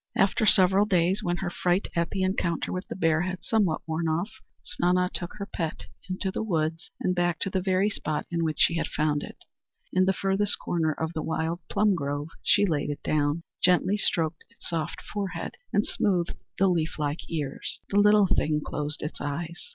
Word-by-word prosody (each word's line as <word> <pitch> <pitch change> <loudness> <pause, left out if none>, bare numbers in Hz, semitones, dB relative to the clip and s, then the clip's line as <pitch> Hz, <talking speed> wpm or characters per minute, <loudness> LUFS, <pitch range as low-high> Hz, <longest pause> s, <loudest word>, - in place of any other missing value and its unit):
After 200 +2 +3
several 190 +1 +6
days, 185 0 +2
when 175 0 -1
her 175 0 -3
fright 180 +2 +1
at 170 -1 +1
the 190 -2 -1
encounter 180 -3 0
with 185 0 -4
the - - -5
bear 165 -3 +2
had 185 0 -3
somewhat 200 -8 +1
worn 160 +1 -1
off, 170 +7 0 0.3
Snana 180 +1 +1
took 175 - -4
her 205 -1 -5
pet 165 -4 -4 0.2
into 190 +1 -1
the - - -3
woods 165 -4 -1
and 180 - +1
back 175 -1 +1
to 195 - 0
the 190 - 0
very 190 +1 +2
spot 155 -7 -2
in 170 -1 0
which 155 -2 -1
she 170 - +4
had - - -1
found 150 -1 0
it. - - -8 0.6
In 185 0 +4
the 190 - +4
furthest 195 +2 +1
corner 160 -2 0
of 160 +2 -3
the 155 - -2
wild 160 +2 -1
plum 205 0 +3
grove 145 -2 -2
she 205 - +4
laid 150 -6 0
it 145 - -5
down, 150 +2 +1 0.2
gently 180 +2 +4
stroked 165 -5 0
its - - -10
soft 165 -2 -3
forehead, 200 -2 -4 0.2
and 205 - +2
smoothed 180 -4 0 0.2
the 195 - +4
leaf 165 -3 0
like 150 +1 -3
ears. 150 -4 -3
The 200 - +3
little 210 0 +6
thing 155 -4 +1
closed 150 0 -3
its 150 - -5
eyes. 160 - -4
175 Hz, 200 wpm, -27 LUFS, 160-190 Hz, 0.6 s, several